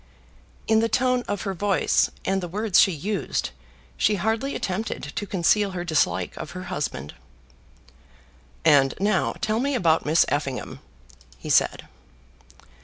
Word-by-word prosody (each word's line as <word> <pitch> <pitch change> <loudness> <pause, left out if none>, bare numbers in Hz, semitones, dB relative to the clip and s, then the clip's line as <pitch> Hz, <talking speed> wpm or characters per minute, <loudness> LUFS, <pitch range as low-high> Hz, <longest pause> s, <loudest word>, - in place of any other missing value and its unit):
In 220 0 +4
the 225 0 +1
tone 250 +2 +2
of 205 - -3
her 195 - -2
voice, 195 +2 +1 0.2
and 195 0 0
the 175 - -4
words 205 +2 +3
she 195 - +4
used, 190 +6 -3 0.5
she 210 - +2
hardly 220 +8 -1
attempted 200 +4 -3
to 205 - -3
conceal 195 +2 +2
her 175 - -3
dislike 160 -3 0
of - - -7
her - - -6
husband. 70 +2 -4 1.5
"And 135 -2 +5
now 200 -1 +1
tell 220 +1 0
me 280 +2 0
about 165 -8 +2
Miss 160 +2 +4
Effingham," 140 -3 -3 0.6
he - - -5
said. - - +3
195 Hz, 140 wpm, -24 LUFS, 170-220 Hz, 1.5 s, And